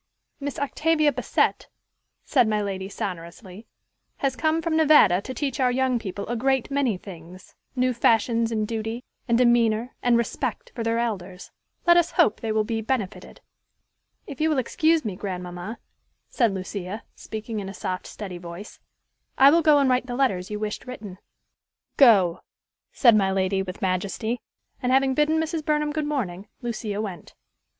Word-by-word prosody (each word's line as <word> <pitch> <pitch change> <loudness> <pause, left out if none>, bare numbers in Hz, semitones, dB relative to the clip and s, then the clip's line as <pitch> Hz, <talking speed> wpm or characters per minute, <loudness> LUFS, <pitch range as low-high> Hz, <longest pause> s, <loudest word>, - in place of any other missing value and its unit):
"Miss 285 -2 -4
Octavia 305 +1 +2
Bassett," - - 0 0.6
said 250 -6 +3
my 215 -1 +1
lady 195 -2 -3
sonorously, 185 +2 -7 0.5
"has 270 -2 -1
come 315 +3 +1
from 330 -1 -1
Nevada 295 - +5
to 260 - -7
teach 275 +1 -3
our 255 -1 +3
young 255 -1 +1
people 200 -2 -5
a 240 - -2
great 265 +2 0
many 270 -8 +1
things, 180 -1 -12 0.2
new 255 0 +1
fashions 230 0 +2
in 215 -1 0
duty, 225 +2 -4 0.2
and 235 -1 +3
demeanor, 240 -1 +3
and 245 -1 +3
respect 235 0 -3
for 235 - -5
their 230 0 0
elders. 195 -6 -4 0.3
Let 345 0 +6
us 345 -1 +2
hope 215 - +3
they 225 - -2
will 215 0 +2
be 225 +1 -2
benefited." 220 -4 -4 0.8
"If 280 - -8
you 315 - +3
will 305 - +1
excuse 315 +4 +2
me, 205 -4 -3
grandmamma," 180 +2 -6 0.5
said 235 -5 +2
Lucia, 190 +2 -5
speaking 220 0 -6
in 195 -1 -5
a - - -7
soft, 185 0 -4
steady 190 -4 -7
voice, 175 +4 -9 0.6
"I 275 +1 +8
will 335 +2 +4
go 305 -2 +5
and 280 -1 +3
write 255 0 +1
the 245 - -4
letters 195 -9 0
you 210 - -3
wished 215 +3 -4
written." 205 -7 -8 0.8
"Go," 195 -10 +6 0.5
said 235 -5 +5
my 195 -2 +3
lady 190 0 +1
with 190 0 -7
majesty; 200 +6 -1 0.4
and, 250 -1 0
having 265 0 +3
bidden 300 +3 +2
Mrs. 320 0 -2
Burnham 300 0 0
good 305 -1 -2
morning, 205 -10 -3 0.2
Lucia 220 -3 -3
went. 195 -6 -6
230 Hz, 165 wpm, -24 LUFS, 195-265 Hz, 0.8 s, I